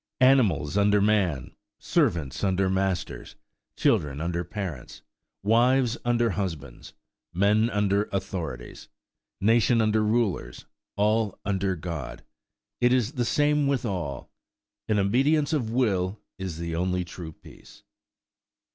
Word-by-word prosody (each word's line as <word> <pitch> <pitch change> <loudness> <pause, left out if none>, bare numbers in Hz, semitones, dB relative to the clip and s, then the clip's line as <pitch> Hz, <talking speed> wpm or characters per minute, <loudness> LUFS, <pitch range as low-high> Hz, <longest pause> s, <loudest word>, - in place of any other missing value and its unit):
Animals 105 - +3
under 105 0 +4
man–servants 85 -5 -1
under 95 -1 +1
masters–children 90 -6 -2
under 85 +2 -2
parents–wives 110 - -1
under 120 -1 +2
husbands–men 95 - -2
under 105 -1 +1
authorities–nations 100 - -2
under 110 0 +2
rulers–all 105 - -1
under 95 -1 0
God,–it 85 - -5
is 125 -2 +2
the 125 -5 -1
same 150 +1 +2
with 135 -3 0
all:–in 105 - -6
obedience 140 +10 +2
of 125 -8 0
will 105 -5 0 0.2
is 95 -4 -5
the 85 -1 -4
only 90 +1 -1
true 85 -1 -8
peace. - - -17
100 Hz, 90 wpm, -26 LUFS, 90-115 Hz, 0.2 s, under